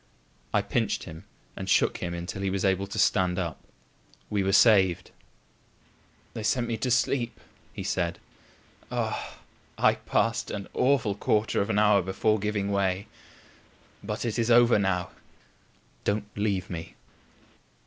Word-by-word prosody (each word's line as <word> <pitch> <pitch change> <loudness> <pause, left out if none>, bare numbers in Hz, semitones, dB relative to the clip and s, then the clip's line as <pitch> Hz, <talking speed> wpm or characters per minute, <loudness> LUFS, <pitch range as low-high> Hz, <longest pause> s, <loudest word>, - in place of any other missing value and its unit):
I - - +2
pinched - - -1
him 80 +4 -10 0.3
and - - -6
shook - - +3
him 85 -1 -4
until 85 +3 -5
he 100 - 0
was 95 +1 -1
able 95 0 +1
to 100 - -7
stand 90 -3 +2
up. 85 -4 -3 0.7
We 105 - +1
were 95 0 +1
saved! 95 -4 +4 1.2
"They 110 - -5
sent 120 +3 0
me 115 - -1
to 125 - -2
sleep," 120 0 0 0.3
he - - -6
said. - - -1 0.7
"Ah! - - -3 0.4
I - - +4
passed 115 0 -1
an 100 -2 -5
awful 125 -6 +2
quarter 105 +1 +1
of 100 - -2
an 105 - +1
hour 105 -2 +5
before 100 +4 0
giving 100 -1 -1
way. 95 -1 0 1.0
But 105 +3 -4
it 115 0 -2
is 115 0 +1
over 120 -2 +6
now. 90 -3 0 0.9
Don't 105 +1 0
leave 100 -3 -1
me." 85 -2 -7
100 Hz, 145 wpm, -27 LUFS, 95-110 Hz, 1.2 s, over